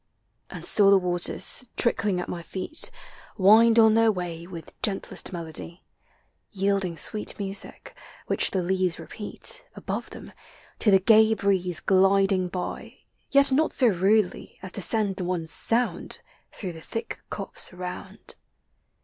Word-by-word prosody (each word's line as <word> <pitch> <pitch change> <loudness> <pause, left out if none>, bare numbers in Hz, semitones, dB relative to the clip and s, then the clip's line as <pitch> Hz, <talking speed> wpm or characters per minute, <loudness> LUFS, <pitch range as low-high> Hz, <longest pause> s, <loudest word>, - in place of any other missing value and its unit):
And - - -8
still 200 -2 +4
the 200 - +6
waters, 180 +5 0
trickling 205 -6 0
at 180 - -5
my 175 - -5
feet, 190 - -4 0.5
Wind 225 +4 +5
on 220 -1 +6
their 225 0 +4
way 175 -3 -6
with 170 -3 -10
gentlest 210 -6 -2
melody, 170 0 -7 0.7
Yielding 195 -3 -1
sweet 210 +7 0
music, 195 -1 -5 0.3
which - - +3
the 185 -2 -2
leaves 185 -1 0
repeat, 235 - -4
Above - - -5
them, - - -11 0.5
to 215 - +2
the 195 - +7
gay 220 +3 +4
breeze 185 -4 0
gliding 195 0 +2
by, 180 0 -6 0.2
— - - -44
Yet 280 0 +5
not 305 +4 +2
so 245 -4 +4
rudel}^ 195 +1 0
as 185 - -5
to 200 - -1
send 200 -2 +1
one 180 -2 -2
sound 230 +9 0 0.3
Through 185 -4 -7
the 160 - -11
thick 230 +7 -6
copse 195 - 0
around. 180 0 -8
195 Hz, 140 wpm, -25 LUFS, 180-220 Hz, 0.7 s, the